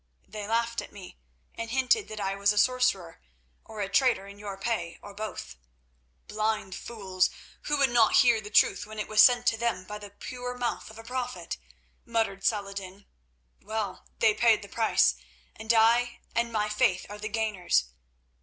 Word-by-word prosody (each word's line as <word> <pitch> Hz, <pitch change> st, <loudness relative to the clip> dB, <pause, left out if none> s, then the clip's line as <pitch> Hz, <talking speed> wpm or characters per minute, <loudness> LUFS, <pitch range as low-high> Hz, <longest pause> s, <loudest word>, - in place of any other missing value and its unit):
"They 210 Hz, -1 st, -7 dB
laughed 230 Hz, +1 st, 0 dB
at -, -, -11 dB
me, 190 Hz, -, -12 dB, 0.3 s
and 230 Hz, 0 st, -6 dB
hinted 265 Hz, -, +2 dB
that 215 Hz, 0 st, -7 dB
I 195 Hz, -1 st, -1 dB
was 200 Hz, +1 st, +3 dB
a 210 Hz, -, -4 dB
sorcerer, 250 Hz, -8 st, +1 dB, 0.4 s
or 215 Hz, -1 st, -8 dB
a 195 Hz, -, -1 dB
traitor 230 Hz, 0 st, +2 dB
in 200 Hz, +1 st, -12 dB
your 200 Hz, -2 st, -6 dB
pay, 195 Hz, -5 st, -3 dB
or 205 Hz, -, -11 dB
both." 200 Hz, -, -6 dB, 0.7 s
"Blind 215 Hz, -2 st, -1 dB
fools, 190 Hz, -4 st, -1 dB, 0.4 s
who 295 Hz, -, +1 dB
would 275 Hz, -3 st, +3 dB
not 230 Hz, -2 st, +4 dB
hear 240 Hz, -4 st, +5 dB
the 210 Hz, -, -9 dB
truth 210 Hz, -, +3 dB
when 215 Hz, 0 st, -10 dB
it 210 Hz, -, -3 dB
was 215 Hz, 0 st, +5 dB
sent 245 Hz, -1 st, +6 dB
to 225 Hz, -, +2 dB
them 235 Hz, -6 st, -1 dB
by 210 Hz, +2 st, -7 dB
the 205 Hz, -1 st, -10 dB
pure 245 Hz, +4 st, -7 dB
mouth 245 Hz, -1 st, -3 dB
of 220 Hz, -, -13 dB
a 225 Hz, -, -10 dB
prophet," 245 Hz, -7 st, -4 dB, 0.5 s
muttered 220 Hz, -4 st, -1 dB
Saladin. 200 Hz, -2 st, -2 dB, 0.6 s
"Well, 210 Hz, -2 st, -4 dB
they 220 Hz, -2 st, +4 dB
paid 225 Hz, -1 st, +3 dB
the -, -, -9 dB
price, 225 Hz, -1 st, +3 dB, 0.4 s
and 220 Hz, +1 st, -1 dB
I 235 Hz, +2 st, +3 dB
and 235 Hz, 0 st, 0 dB
my 210 Hz, -2 st, 0 dB
faith 210 Hz, -3 st, +1 dB
are 205 Hz, +1 st, -9 dB
the 215 Hz, +1 st, -4 dB
gainers. 215 Hz, -, +1 dB
215 Hz, 180 wpm, -28 LUFS, 200-235 Hz, 0.7 s, sent